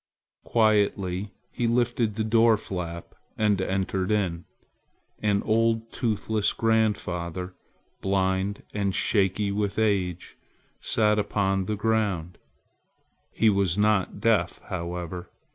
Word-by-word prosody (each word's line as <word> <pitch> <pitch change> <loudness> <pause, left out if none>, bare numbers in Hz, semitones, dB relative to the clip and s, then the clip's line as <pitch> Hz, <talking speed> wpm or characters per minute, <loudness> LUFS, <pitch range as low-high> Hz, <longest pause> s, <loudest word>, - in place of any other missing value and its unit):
Quietly 100 -3 +1 0.2
he 120 - -1
lifted 120 -2 +1
the 110 - -1
door 115 0 +4
flap 85 -4 -6 0.2
and 105 -3 +2
entered 95 0 -1
in. 95 -6 0 0.8
An 105 -1 +1
old 115 0 +1
toothless 110 -2 0
grandfather, 95 -5 0 0.5
blind 95 +1 0
and 100 -2 -1
shaky 100 0 +1
with 100 0 -2
age, 95 -5 0 0.4
sat 105 -1 +2
upon 95 -2 0
the 105 - -2
ground. 100 -6 -1 0.9
He 110 -1 +3
was 95 -3 +1
not 105 -2 +1
deaf - - +1
however. 85 +1 -5
100 Hz, 105 wpm, -26 LUFS, 95-110 Hz, 0.9 s, door